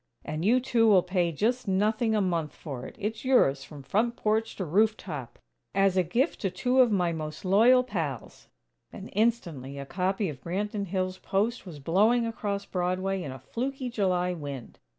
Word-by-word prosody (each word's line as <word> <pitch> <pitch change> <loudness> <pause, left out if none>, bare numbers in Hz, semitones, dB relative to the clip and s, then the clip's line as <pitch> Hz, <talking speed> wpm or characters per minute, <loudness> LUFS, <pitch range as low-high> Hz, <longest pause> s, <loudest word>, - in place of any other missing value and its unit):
"And 155 +2 -3
you 235 +6 +4
two 245 -3 +2
will 195 -4 +6
pay 180 -2 0
just 230 - 0
nothing 215 +4 +1
a 210 - +2
month 170 -5 -1
for 135 -5 -7
it. - - -12
It's 215 +1 -4
yours, 145 - +3
from 145 0 -11
front 230 - 0
porch 220 -1 0
to 190 - -3
roof 210 +7 +3
top, 135 -9 -7 0.4
as 195 -1 +3
a 185 - +4
gift 235 - 0
to 195 - 0
two 245 +9 0
of 250 -3 +6
my 180 -4 +2
most 155 +1 -6
loyal 235 +7 +5
pals." 165 - -5 0.4
And - - -9
instantly 170 - -1
a 140 - -5
copy 190 +5 -1
of 140 -6 -7
Branton 200 +4 -3
Hills' 185 0 -2
"Post" 205 +4 -1
was 165 -4 -8
blowing 210 - +3
across 205 -3 -3
Broadway 185 +1 -1
in 145 - -5
a 130 - -7
fluky 255 - -4
July 180 -4 +1
wind! 140 -7 -7
195 Hz, 185 wpm, -28 LUFS, 165-220 Hz, 0.4 s, will